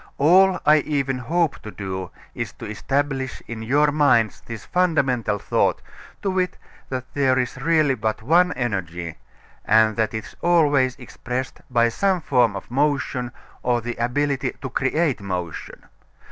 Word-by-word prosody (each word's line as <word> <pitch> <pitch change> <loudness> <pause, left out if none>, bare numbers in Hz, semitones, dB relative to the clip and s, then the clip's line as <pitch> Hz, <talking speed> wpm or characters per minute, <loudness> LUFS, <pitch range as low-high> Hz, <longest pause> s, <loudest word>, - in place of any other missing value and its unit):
All 185 +5 +5
I 150 +1 +7
even 140 -3 -1
hope 160 +5 0
to 110 - -8
do 95 -3 -5 0.2
is - - -5
to - - -10
establish 135 +4 -2
in 115 -1 -6
your 145 +6 +2
minds 130 -7 +3
this 115 -3 -8
fundamental 135 - +1
thought, - - +1 0.4
to 195 - 0
wit, 185 -1 -1 0.3
that 130 -1 -5
there 135 -2 +2
is 125 0 -2
really 155 -2 +3
but 110 -2 -2
one 175 +7 +4
Energy, 90 - -4 0.4
and 110 0 +4
that 110 0 0
it 110 - -4
is - - -13
always 145 -7 +3
expressed 125 +2 -5
by 120 -2 +3
some 190 +9 +1
form 125 -9 +2
of 100 - -8
motion 140 -3 0 0.3
or 120 -1 +1
the 120 +1 -5
ability 135 +4 0
to 130 - -6
create 135 0 0
motion. 90 -4 -5
130 Hz, 150 wpm, -22 LUFS, 115-150 Hz, 0.4 s, I